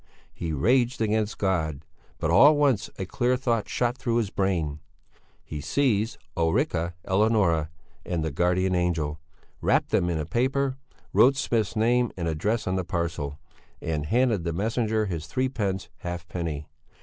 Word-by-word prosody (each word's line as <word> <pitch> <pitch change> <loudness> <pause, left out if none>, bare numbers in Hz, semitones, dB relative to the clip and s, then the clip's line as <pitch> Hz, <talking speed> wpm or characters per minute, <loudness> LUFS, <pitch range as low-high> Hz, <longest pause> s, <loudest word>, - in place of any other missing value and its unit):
He 80 - -4
raged 120 - +2
against 110 -1 0
God. 80 -7 -1 0.3
But 80 - -1
all 115 +11 +8
at - - -1
once 140 -8 +2
a 95 - -3
clear 125 +6 +1
thought 120 -4 0
shot 120 0 0
through 120 -3 -1
his 110 -4 0
brain. 85 -7 -1 0.6
He 75 -2 -6
seized 115 - +1 0.2
Ulrica 85 - 0
Eleonora 95 -6 +2 0.3
and 85 -3 -2
the 80 - -2
guardian 90 +4 +1
angel, 80 -4 0 0.4
wrapped - - +2
them 90 - +2
in 80 -3 -1
paper, 130 - 0 0.4
wrote 135 +2 +6
Smith's 115 -5 0
name 120 +2 +2
and 85 -2 -2
address 100 +9 0
on 95 0 0
the 95 - -1
parcel, 85 -5 -3 0.4
and 75 -2 -2
handed 115 -3 +2
the 85 -1 -2
messenger 110 +3 0
his 85 -5 -4
threepence 105 -3 -1
halfpenny. 85 -3 -4
95 Hz, 150 wpm, -26 LUFS, 85-115 Hz, 0.6 s, all